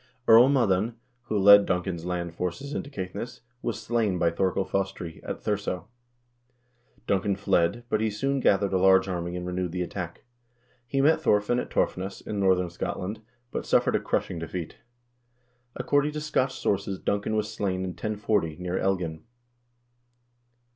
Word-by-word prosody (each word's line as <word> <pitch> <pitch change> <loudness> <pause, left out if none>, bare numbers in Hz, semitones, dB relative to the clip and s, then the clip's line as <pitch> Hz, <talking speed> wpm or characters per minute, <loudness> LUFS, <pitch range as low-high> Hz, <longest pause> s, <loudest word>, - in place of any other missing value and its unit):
Earl 115 +3 +8
Moddan, 115 -4 +2 0.3
who 110 -3 -1
led 100 +1 +8
Duncan's 90 -2 -2
land 90 -1 -3
forces 90 +12 -4
into 140 - -4
Caithness, 100 -1 -6 0.2
was 115 - -3
slain 110 -5 0
by 85 -1 +2
Thorkel 95 +2 0
Fostri, 95 -4 -3
at - - -6
Thurso. 100 -2 -2 1.2
Duncan 100 0 +1
fled, 100 +2 +1
but 110 - 0
he 110 - +1
soon 135 +7 -1
gathered 100 -5 +2
a 95 - +3
large 95 +1 +5
army 85 -1 -3
and 90 0 -4
renewed 90 -1 -2
the 90 -1 -1
attack. 90 -2 -6 0.6
He 135 +1 +1
met 155 +3 +4
Thorfinn 105 +4 +2
at - - -4
Torfness, 95 +2 -1
in 105 - -5
northern 90 -2 +2
Scotland, 100 +5 -4 0.3
but - - -3
suffered - - +2
a - - +3
crushing 85 - -2
defeat. 80 0 -5 1.0
According 145 +3 +1
to 155 - -3
Scotch 135 -3 0
sources 100 -1 -1
Duncan 100 +3 -1
was 105 -1 -1
slain 95 -2 -1
in 95 - -3
1040, 105 -5 -1
near 90 0 -2
Elgin. 90 -5 -1
95 Hz, 155 wpm, -27 LUFS, 90-110 Hz, 1.2 s, Earl